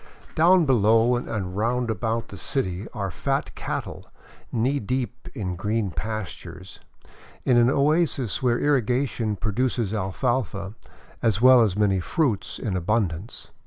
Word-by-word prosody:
Down 175 Hz, +1 st, +5 dB
below 115 Hz, -1 st, +4 dB
and 105 Hz, -6 st, -4 dB
round 120 Hz, +3 st, 0 dB
about 115 Hz, +1 st, -2 dB
the 100 Hz, -, -9 dB
city 100 Hz, -6 st, -2 dB
are 100 Hz, -5 st, -4 dB
fat 80 Hz, -, -2 dB
cattle -, -, -5 dB, 0.4 s
knee 130 Hz, +5 st, +1 dB
deep 125 Hz, 0 st, -3 dB
in 95 Hz, -7 st, -3 dB
green 105 Hz, +1 st, -1 dB
pastures, 105 Hz, +5 st, -6 dB, 0.7 s
in 125 Hz, -, +4 dB
an 120 Hz, +1 st, +5 dB
oasis 140 Hz, -, +1 dB
where 120 Hz, -2 st, +2 dB
irrigation 125 Hz, -5 st, +1 dB
pro 105 Hz, +2 st, -2 dB
duces 120 Hz, -2 st, -1 dB
alfalfa, 100 Hz, -1 st, -2 dB, 0.5 s
as 110 Hz, -3 st, +1 dB
well 130 Hz, 0 st, +7 dB
as 105 Hz, -4 st, +1 dB
many 100 Hz, -3 st, +2 dB
fruits, 125 Hz, -, -1 dB
in 105 Hz, -7 st, -3 dB
abundance. 95 Hz, 0 st, -2 dB
115 Hz, 130 wpm, -24 LUFS, 100-125 Hz, 0.7 s, well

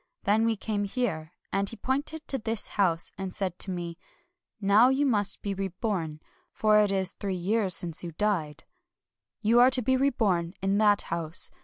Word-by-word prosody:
Then 220 Hz, +2 st, +2 dB
we 225 Hz, -, +1 dB
came 205 Hz, -1 st, -2 dB
here, 195 Hz, -8 st, -2 dB, 0.2 s
and 195 Hz, 0 st, 0 dB
he -, -, -7 dB
pointed 285 Hz, +7 st, -2 dB
to 270 Hz, -, 0 dB
this 225 Hz, -1 st, -1 dB
house, 175 Hz, -5 st, 0 dB
and 190 Hz, -1 st, -4 dB
said 185 Hz, -2 st, -2 dB
to -, -, 0 dB
me: 175 Hz, -2 st, -5 dB, 0.2 s
— 345 Hz, +1 st, -43 dB
' -, -, -65 dB
Now 210 Hz, +4 st, +5 dB
you 270 Hz, +2 st, +1 dB
must 205 Hz, -6 st, -1 dB
be 200 Hz, -, -2 dB
reborn, 190 Hz, -5 st, -3 dB, 0.2 s
— -, -, -40 dB
for 215 Hz, -1 st, +5 dB
it 205 Hz, -1 st, +3 dB
is 190 Hz, -1 st, 0 dB
three 195 Hz, -2 st, -4 dB
years 190 Hz, +1 st, +2 dB
since 170 Hz, -1 st, 0 dB
you 170 Hz, -, -5 dB
died. 165 Hz, -6 st, -1 dB, 0.8 s
You 230 Hz, +2 st, +4 dB
are 250 Hz, +1 st, +7 dB
to 255 Hz, -1 st, 0 dB
be 260 Hz, +4 st, +2 dB
reborn 205 Hz, -10 st, 0 dB
in 195 Hz, +1 st, 0 dB
that 205 Hz, -1 st, +4 dB
house. 165 Hz, 0 st, +1 dB
205 Hz, 195 wpm, -27 LUFS, 180-230 Hz, 0.8 s, are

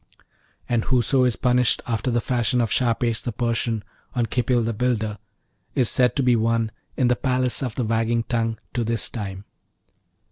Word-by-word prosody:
And 120 Hz, -2 st, 0 dB
whoso 130 Hz, +1 st, +3 dB
is 125 Hz, -2 st, +2 dB
punished 125 Hz, -1 st, +2 dB
after 115 Hz, +1 st, -1 dB
the 120 Hz, -1 st, +1 dB
fashion 125 Hz, -1 st, +1 dB
of 115 Hz, -3 st, 0 dB
Shahpesh, 115 Hz, -2 st, +1 dB
the 120 Hz, -, -3 dB
Persian, 115 Hz, -1 st, -1 dB, 0.3 s
on 120 Hz, -2 st, +2 dB
Khipil 120 Hz, +1 st, +1 dB
the 115 Hz, +1 st, -1 dB
Builder, 110 Hz, -3 st, -1 dB, 0.6 s
is 125 Hz, -5 st, +2 dB
said 125 Hz, -1 st, +2 dB
to 140 Hz, -, +1 dB
be 125 Hz, -1 st, +4 dB
one 115 Hz, 0 st, +1 dB, 0.3 s
'in 130 Hz, -, +3 dB
the 125 Hz, -, +3 dB
Palace 125 Hz, -1 st, +1 dB
of 125 Hz, -5 st, -3 dB
the 125 Hz, -, -1 dB
Wagging 115 Hz, +1 st, +1 dB
Tongue' 115 Hz, -1 st, -1 dB, 0.2 s
to 120 Hz, -, 0 dB
this 115 Hz, -2 st, 0 dB
time. 100 Hz, -3 st, -6 dB
120 Hz, 175 wpm, -23 LUFS, 115-125 Hz, 0.6 s, be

